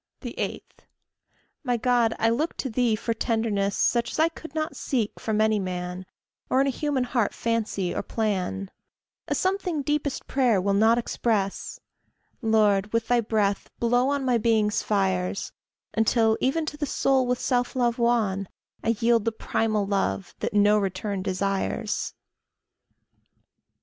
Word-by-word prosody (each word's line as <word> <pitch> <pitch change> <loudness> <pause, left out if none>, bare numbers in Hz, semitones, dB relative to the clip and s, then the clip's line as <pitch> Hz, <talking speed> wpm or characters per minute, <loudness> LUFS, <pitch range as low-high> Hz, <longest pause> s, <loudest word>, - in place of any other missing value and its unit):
8. - - -4 1.0
My 245 -3 +1
God, 235 -1 +2
I 225 +1 +2
look 300 +8 -1
to 265 - -3
thee 235 -1 +2
for 230 +2 -2
tenderness 220 -4 0
Such 235 -1 +1
as - - -4
I 320 +1 +4
could 325 -2 -11
not 310 0 -2
seek 235 -7 -2
from 215 -1 -1
any 215 -1 +3
man, 180 -1 -4 0.4
Or 260 - +3
in 275 - +4
a 275 - +1
human 280 -1 -1
heart 240 -4 0
fancy 215 -6 -1
or - - -1
plan 195 -3 -2 0.6
A - - 0
something 370 -5 0
deepest 295 -1 -1
prayer 250 -7 +2
will 200 +2 +1
not 220 +3 +4
express: 220 -4 -1 0.6
Lord, 210 -3 +3
with 230 0 -1
thy 245 -1 +4
breath 210 -3 0
blow 245 +2 +2
on 280 -1 -1
my 245 -2 +2
being's 220 -2 +2
fires, 190 -2 0 0.4
Until, 225 0 +3
even 310 +5 +1
to 295 - -5
the 295 - -2
soul 265 -2 +2
with 250 0 +1
self 245 -1 0
love 240 -1 +1
wan, 215 -5 +1 0.4
I 230 +1 +2
yield 230 -1 +3
the 230 - 0
primal 215 -1 0
love, 95 - -1
that - - -3
no 210 +1 +5
return 195 0 -2
desires. 195 +2 -2
225 Hz, 150 wpm, -26 LUFS, 200-245 Hz, 1.0 s, no